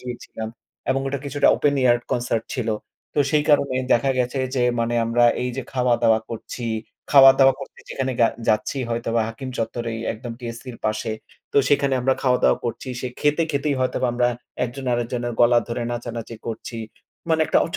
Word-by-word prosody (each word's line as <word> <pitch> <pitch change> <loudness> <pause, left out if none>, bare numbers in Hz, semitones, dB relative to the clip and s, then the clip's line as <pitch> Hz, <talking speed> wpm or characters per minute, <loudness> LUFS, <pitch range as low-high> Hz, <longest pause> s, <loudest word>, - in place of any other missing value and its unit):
গিয়েছিলাম। 120 -3 -6 0.4
এবং 135 - +1
এটা 140 0 -2
কিছুটা 140 +1 +2
ওপেন 145 -1 +2
এয়ার 120 -1 +5
কনসার্ট 120 -2 -1
ছিল। 120 -4 -2 0.5
তো - - -1
সেই 150 -1 +3
কারণে 140 -3 +3 0.2
দেখা 135 +3 +3
গেছে 125 +2 0 0.2
যে, 125 - +1 0.2
মানে 115 +1 0
আমরা 120 +1 +3 0.2
এইযে 125 +1 -3
খাওয়া-দাওয়া 120 -3 +3
করছি, 115 +2 -6 0.5
খাওয়া-দাওয়া 135 -1 +8
করতে 135 - -10
যেখানে 130 -1 -2
গা 115 - +6 0.2
যাচ্ছি। 110 +5 +1
হয়তোবা 115 0 0
হাকিম 120 +4 -7
চত্বরেই 115 0 -3
একদম 115 +2 -7
TSC-র 120 +1 -7
পাশে। 110 +1 -1 0.4
তো - - +4
সেখানে 140 -1 +3
আমরা 130 +2 +2
খাওয়া-দাওয়া 125 -2 +3
করছি। 120 +2 -4
সে 125 - -3
খেতে, 150 +3 +2
খেতেই 145 0 0
হয়তোবা 130 0 0
আমরা 120 0 +2 0.4
একজন 130 +2 -6
আরেকজনের 120 0 -2
গলা 120 0 +6
ধরে 120 +1 -2
নাচানাচি 115 -1 -5
করছি। 115 +1 -5 0.5
মানে 160 -1 +2
একটা - - +3
ওচ 165 - -5
125 Hz, 165 wpm, -23 LUFS, 115-135 Hz, 0.5 s, খাওয়া-দাওয়া